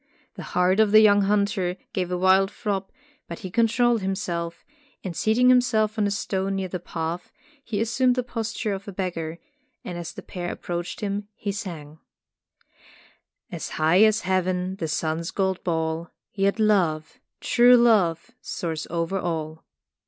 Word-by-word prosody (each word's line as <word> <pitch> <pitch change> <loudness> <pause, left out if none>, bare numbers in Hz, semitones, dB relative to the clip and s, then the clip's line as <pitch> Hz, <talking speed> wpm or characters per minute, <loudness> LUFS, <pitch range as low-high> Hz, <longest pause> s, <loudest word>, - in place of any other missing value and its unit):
The - - -9 0.2
heart 180 +3 +3
of 220 -1 +5
the 215 - +8
young 205 -1 +6
hunter 200 -3 0 0.2
gave 180 -2 -1
a 180 - -1
wild 190 +1 +4
throb, 200 -2 -3 0.4
but 170 - -6
he 185 - -5
controlled 235 +1 +2
himself, 175 -3 -3 0.4
and 180 -3 -5
seating 235 +6 +3
himself 225 -4 +3
on 205 - +2
a - - 0
stone 195 -1 -2
near 190 -1 -3
the 180 - -4
path, 170 0 -5 0.3
he 220 -6 -3
assumed 245 +3 +2
the 250 - 0
posture 225 -3 -3
of 195 +1 -7
a - - -5
beggar, 170 -4 -4 0.5
and 175 -1 -5
as 170 - -6
the - - -10
pair 175 -1 -5
approached 175 0 -5
him, 205 0 -3
he 205 - -3
sang: 160 -6 -7 1.5
"As - - -5
high 160 +5 +4
as 220 0 +4
Heaven 185 0 -1
the 165 - -3
sun's 160 +2 -2
gold 190 -1 -1
ball 160 -1 -2
— - - -66
Yet 200 +1 +1
love, 170 -8 +1 0.2
true 245 +1 +5
love 210 -5 +3
soars 165 -4 -4
over 170 +3 -1
all." 160 -2 -4
190 Hz, 160 wpm, -24 LUFS, 170-215 Hz, 1.5 s, the